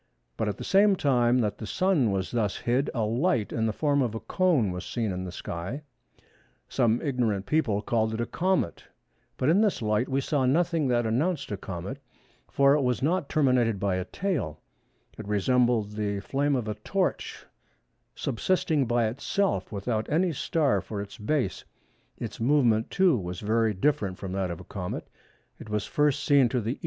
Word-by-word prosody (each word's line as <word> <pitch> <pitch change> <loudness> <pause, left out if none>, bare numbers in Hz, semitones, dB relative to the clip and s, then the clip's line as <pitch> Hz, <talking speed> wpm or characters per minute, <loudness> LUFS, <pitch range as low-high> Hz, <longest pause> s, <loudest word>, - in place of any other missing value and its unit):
But 110 - -1
at 100 - -4
the - - -7
same 200 +1 +4
time 125 -6 +2
that 105 -3 -2
the 110 - -6
Sun 160 - +2
was 95 -1 -2
thus 110 -5 0
hid, 125 +4 0
a 115 - -1
light, 115 - 0
in 115 -1 0
the - - +1
form 145 +4 +1
of 120 -4 -1
a - - -3
cone 155 - +1
was 90 0 -5
seen 115 -4 -2
in 90 0 -4
the 90 - -6
sky; 90 - -5 0.8
some 115 0 +2
ignorant 120 -9 0
people 110 -10 +1
called 110 -2 +1
it - - -5
a 120 - 0
comet, 180 - -1 0.5
but 130 - 0
in 175 +7 +4
this 210 -3 +2
light 105 +2 0
we 135 +1 +1
saw 135 -1 0
nothing 165 +1 +2
that 120 -2 +1
announced 140 +6 0
a - - 0
comet, 95 +7 -6 0.5
for 140 0 +4
it 150 - +2
was 125 0 0
not 165 0 0
terminated 125 -8 +2
by 100 -1 0
a 90 - -3
tail; 140 - -3 0.6
it 110 - -7
resembled 115 +1 +2
the 105 -1 -2
flame 140 +7 0
of 120 -4 -2
a 105 - -1
torch, - - -2 0.7
subsisting 155 0 0
by 120 -1 +2
itself, 160 - -1
without 110 +2 -2
any 170 +4 +2
star 150 0 +1
for 105 - -6
its 100 0 -7
base. 105 - -1 0.5
Its - - -6
movement 115 -3 +3
too 185 -5 +3
was 90 -4 -4
very 110 0 +1
different 100 -4 0
from 95 - -6
that 95 -1 -1
of 85 - -5
a - - -10
comet. 90 -2 -5 0.5
It - - -10
was 105 -1 -1
first 145 -3 +1
seen 140 -4 +4
to 125 - 0
the 115 +4 -3
E. - - -32
120 Hz, 190 wpm, -27 LUFS, 105-145 Hz, 0.8 s, same